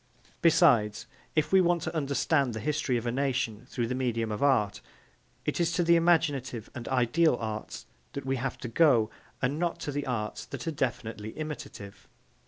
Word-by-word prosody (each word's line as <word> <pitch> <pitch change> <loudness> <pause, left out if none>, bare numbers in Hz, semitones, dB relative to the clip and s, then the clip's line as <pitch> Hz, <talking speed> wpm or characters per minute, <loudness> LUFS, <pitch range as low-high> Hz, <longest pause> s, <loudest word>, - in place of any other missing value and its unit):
Besides, 140 - +4 0.3
if 155 -1 +1
we 190 0 +6
want 175 -1 +2
to 160 - -4
understand 140 -3 +1
the - - -3
history 145 0 0
of 115 - -4
a 120 - 0
nation 125 -3 -1
through 120 - -1
the 120 - -2
medium 115 -3 -1
of 105 - -4
art, 105 -8 +2 0.6
it - - -1
is 170 -1 +2
to 175 - +2
the 170 0 +5
imaginative 145 -9 +1
and 120 -4 -7
ideal 130 +4 +3
arts 110 -1 -5 0.3
that 140 - -5
we 135 0 0
have 130 +2 -3
to - - -4
go 115 -4 +4 0.3
and 140 +5 0
not 175 -1 -1
to 145 - -3
the 145 0 -3
arts 110 -4 -3
that - - -7
are - - +1
definitely 115 -6 -3
imitative. 140 -10 -7
135 Hz, 185 wpm, -29 LUFS, 115-155 Hz, 0.6 s, we